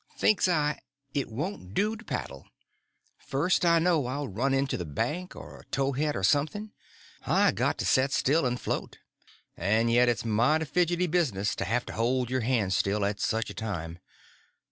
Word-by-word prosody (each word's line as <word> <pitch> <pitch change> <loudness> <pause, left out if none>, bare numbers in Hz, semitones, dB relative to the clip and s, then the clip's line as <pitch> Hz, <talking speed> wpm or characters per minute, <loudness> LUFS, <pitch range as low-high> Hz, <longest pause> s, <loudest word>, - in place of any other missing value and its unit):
Thinks 210 -3 +3
I, 150 -4 +1 0.3
it 140 -4 -1
won't 115 - -5
do 215 +2 +1
to 220 - -12
paddle; - - -5 0.7
first 150 +7 0
I 170 -1 +5
know 165 -5 +2
I'll 140 +3 -3
run 120 +6 -1
into 135 0 +1
the 90 - -3
bank 150 - -3
or - - -10
a - - -16
towhead 140 +2 -1
or 95 - -3
something; 155 - +1 0.6
I - - +4
got - - 0
to - - -2
set 130 +1 +3
still 140 +1 +2
and 125 0 -2
float, - - -4 0.6
and 110 +6 +1
yet 120 +1 +5
it's 115 -1 -1
mighty 120 +9 +2
fidgety 175 +3 +1
business 140 - 0
to - - -2
have 125 +2 0
to - - -7
hold 125 +2 0
your 130 0 0
hands 110 -5 +1
still 100 +1 +1
at 100 0 -2
such 110 +1 -1
a - - -8
time. 85 -6 -5
130 Hz, 180 wpm, -28 LUFS, 110-160 Hz, 0.7 s, I